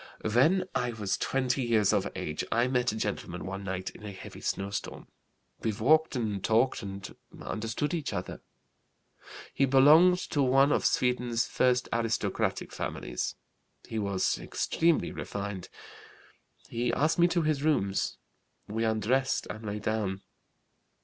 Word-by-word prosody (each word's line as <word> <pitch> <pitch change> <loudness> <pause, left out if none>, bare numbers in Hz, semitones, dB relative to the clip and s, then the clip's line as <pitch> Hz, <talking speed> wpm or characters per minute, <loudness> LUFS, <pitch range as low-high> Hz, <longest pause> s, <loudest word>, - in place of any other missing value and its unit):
"When 140 - +3
I 125 -1 -1
was 105 -3 -1
20 135 0 0
years 110 -5 +3
of - - 0
age 75 0 -3
I 120 +2 +3
met 125 -2 +1
a - - -5
gentleman 100 -4 -3
one 95 +1 -5
night 95 -1 -4
in - - -15
a 105 - -6
heavy 95 - -10
snow 100 +1 -2
storm. 100 - -5 0.5
We 110 - -1
walked 155 +9 +3
and 105 -6 -2
talked 115 +4 +2
and 100 -2 -7 0.2
understood 115 +8 -3
each 160 -5 -2
other. 90 -3 -5 1.1
He 135 - +3
belonged 150 +7 +6
to 145 - +1
one 135 +2 +4
of - - +1
Sweden's 125 -2 +1
first 125 -1 +1
aristocratic 115 -1 -1
families. - - -4 0.5
He 110 - -3
was 100 -2 0
extremely 165 -1 +1
refined. 100 -2 -5 1.0
He 120 +1 -1
asked 155 +8 +1
me 175 - +6
to 175 -1 +1
his 155 -2 +1
rooms. 100 -11 0 0.5
We 110 +2 -2
undressed 115 +5 +1
and 110 - -8
lay 105 -1 -3
down. 105 -3 -2
115 Hz, 145 wpm, -29 LUFS, 100-135 Hz, 1.1 s, belonged